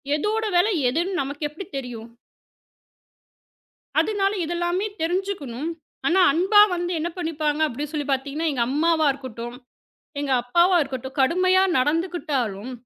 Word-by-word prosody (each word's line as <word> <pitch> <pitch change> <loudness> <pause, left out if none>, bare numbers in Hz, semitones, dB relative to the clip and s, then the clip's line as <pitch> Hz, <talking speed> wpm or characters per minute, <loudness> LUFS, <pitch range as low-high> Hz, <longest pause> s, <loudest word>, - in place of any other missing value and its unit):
எதோட 425 +8 -1
விலை 410 +5 +3 0.2
எதுன்னு 350 +7 -1
நமக்கு 285 +2 -3
எப்படி 320 +6 -9
தெரியும்? 240 -4 -6 1.9
அதனால 395 -2 +1
இது 335 - -3
எல்லாமே 345 +3 0 0.2
தெரிஞ்சுக்கணும். 325 -6 -2 0.4
ஆனா 360 +3 +3
அன்பா 390 +5 +5
வந்து 350 0 -2
என்ன 335 +2 -2
பண்ணிப்பாங்க 310 -3 -1
அப்படின்னு 290 +2 -5
சொல்லிப் 290 -2 -2
பார்த்தீங்கன்னா, 280 +4 -1
எங்க 250 -4 0
அம்மாவா 315 +2 +2
இருக்கட்டும், 240 -3 -8 0.6
எங்க 285 -2 -1
அப்பாவா 345 +9 +3
இருக்கட்டும் 265 -1 -6
கடுமையா 370 +7 +4 0.2
நடந்துக்கிட்டாலும் 275 - -1
310 Hz, 120 wpm, -23 LUFS, 270-355 Hz, 1.9 s, அன்பா